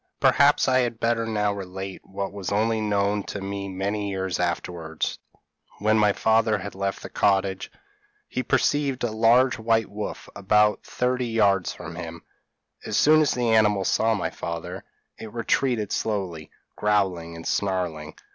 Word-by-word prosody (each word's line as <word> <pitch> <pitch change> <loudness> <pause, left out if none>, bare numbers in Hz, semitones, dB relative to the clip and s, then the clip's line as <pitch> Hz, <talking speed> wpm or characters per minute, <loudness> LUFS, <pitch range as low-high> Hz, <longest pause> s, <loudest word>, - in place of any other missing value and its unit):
p> - - -46 0.2
"Perhaps 140 +1 +4
I 130 0 +4
had 120 -2 -1
better 115 -1 0
now 105 -2 0
relate 95 -1 -6
what 100 0 -5
was 100 -2 -5
only 110 +2 +1
known 105 -1 +1
to 100 - -5
me 100 0 -5
many 100 +2 -2
years 95 -2 -2
afterwards. 80 -3 -3 0.6
When 110 +1 +2
my 105 -1 +4
father 110 +1 +2
had 100 +1 -7
left 100 0 -3
the - - -5
cottage, 95 -1 +1 0.6
he 130 - -2
perceived 135 +1 +1
a 120 - 0
large 115 +3 +4
white 115 -1 +1
wolf 105 +1 -6
about 105 +1 +3
thirty 125 0 -1
yards 100 -5 +2
from 80 +1 -9
him; 85 -1 -7 0.6
as 110 - -2
soon 155 +1 +6
as 150 - +2
the 120 -2 0
animal 105 -3 +3
saw 110 +4 +2
my - - -2
father, 85 -1 -6 0.4
it 110 - -8
retreated 115 -1 0
slowly, 95 -8 -2 0.3
growling 95 -6 0
and 80 0 -9
snarling. 90 -6 -2
105 Hz, 155 wpm, -25 LUFS, 95-115 Hz, 0.6 s, soon